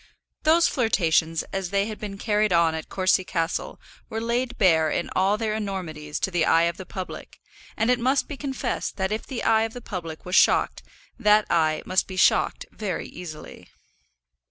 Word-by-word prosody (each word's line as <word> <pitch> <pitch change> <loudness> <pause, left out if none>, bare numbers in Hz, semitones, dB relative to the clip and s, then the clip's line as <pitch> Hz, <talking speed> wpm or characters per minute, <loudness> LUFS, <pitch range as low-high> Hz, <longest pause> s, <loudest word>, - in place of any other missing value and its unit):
Those 330 +2 +4
flirtations, 165 - +1
as 195 -2 -2
they 200 +1 +1
had 215 -1 -6
been 200 -2 -6
carried 210 0 +1
on 170 -2 +4
at 160 0 -6
Courcy 185 0 +2
Castle, 165 -2 -3 0.3
were 220 - -3
laid 240 +2 -1
bare 160 -5 +4
in - - -2
all 195 +3 +2
their 220 -1 -1
enormities 180 -8 -4
to 190 - 0
the 175 -2 +1
eye 165 +1 +4
of 170 0 0
the 190 - -9
public, 185 -1 -8 0.4
and 225 +3 +2
it 250 - +2
must 260 +3 +1
be 290 - -6
confessed 270 -1 -3
that 190 0 -1
if 215 - -3
the 260 -4 -4
eye 220 -1 +4
of 225 0 -2
the 245 - -7
public 165 -8 -7
was 180 - -6
shocked, - - +4 0.4
that 210 0 +4
eye 155 -2 +2
must 185 +1 +1
be 185 - -7
shocked - - +3
very 195 -6 -4
easily. 160 -3 -10
195 Hz, 185 wpm, -25 LUFS, 170-220 Hz, 0.4 s, Those